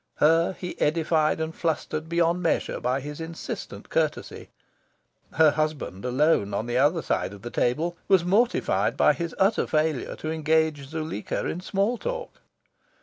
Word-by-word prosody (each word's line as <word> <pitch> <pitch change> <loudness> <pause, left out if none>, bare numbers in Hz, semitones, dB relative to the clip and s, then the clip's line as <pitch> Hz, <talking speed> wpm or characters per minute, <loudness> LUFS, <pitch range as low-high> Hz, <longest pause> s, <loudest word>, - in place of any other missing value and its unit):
Her 165 +4 +3
he 180 -1 -7
edified 155 0 +2
and 160 0 -3
flustered 160 -1 -2
beyond 170 +1 +2
measure 165 - 0
by 130 +2 0
his 150 +3 -7
insistent 165 0 -7
courtesy. - - -2 0.8
Her 155 0 +5
husband, 150 -10 -2
alone 125 -6 +2
on 110 - -1
the 120 +1 0
other 155 +4 +3
side 95 - -1
of 100 0 -12
the 120 - -6
table, 160 +10 0
was 190 -3 +4
mortified 225 +7 +2
by - - +5
his 170 -1 -4
utter 195 +3 +2
failure 155 -3 0
to 155 - -4
engage 160 -2 +1
Zuleika 155 -7 -4
in 175 - -3
small 200 +5 0
talk. - - -5
160 Hz, 150 wpm, -26 LUFS, 145-170 Hz, 0.8 s, Her